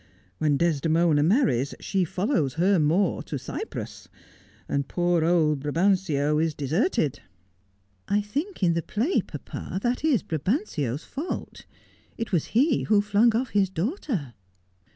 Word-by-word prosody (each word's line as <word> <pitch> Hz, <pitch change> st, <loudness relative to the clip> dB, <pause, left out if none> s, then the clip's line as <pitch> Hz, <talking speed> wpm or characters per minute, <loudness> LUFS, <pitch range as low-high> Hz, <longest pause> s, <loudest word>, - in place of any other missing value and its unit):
When 150 Hz, -2 st, +2 dB
Desdemona 165 Hz, -1 st, +2 dB
marries, 155 Hz, -, +2 dB
she 190 Hz, -2 st, 0 dB
follows 180 Hz, -, -1 dB
her 185 Hz, +3 st, +3 dB
Moor 160 Hz, +6 st, +2 dB
to -, -, -5 dB
Cyprus, 440 Hz, -, -6 dB, 0.6 s
and 140 Hz, -1 st, -1 dB
poor 175 Hz, -2 st, +1 dB
old 160 Hz, -3 st, +2 dB
Brabantio 150 Hz, -1 st, +1 dB
is 160 Hz, -1 st, 0 dB
deserted.' 150 Hz, -, 0 dB, 0.5 s
' 95 Hz, 0 st, -41 dB
I 205 Hz, -, +2 dB
think 280 Hz, -, -4 dB
in 170 Hz, -2 st, +4 dB
the 170 Hz, -, 0 dB
play, 235 Hz, -, 0 dB
papa, 190 Hz, -, -6 dB
that 245 Hz, +3 st, 0 dB
is 285 Hz, -, +2 dB
Brabantio's 155 Hz, -, -2 dB
fault. 300 Hz, +6 st, -6 dB, 0.5 s
It 230 Hz, -, -4 dB
was 175 Hz, -6 st, +1 dB
he 280 Hz, +2 st, +3 dB
who 210 Hz, -1 st, +4 dB
flunpr 210 Hz, +3 st, +3 dB
off 245 Hz, +1 st, 0 dB
his 200 Hz, -2 st, +2 dB
daughter.' 190 Hz, -, -3 dB
175 Hz, 135 wpm, -26 LUFS, 150-220 Hz, 0.6 s, in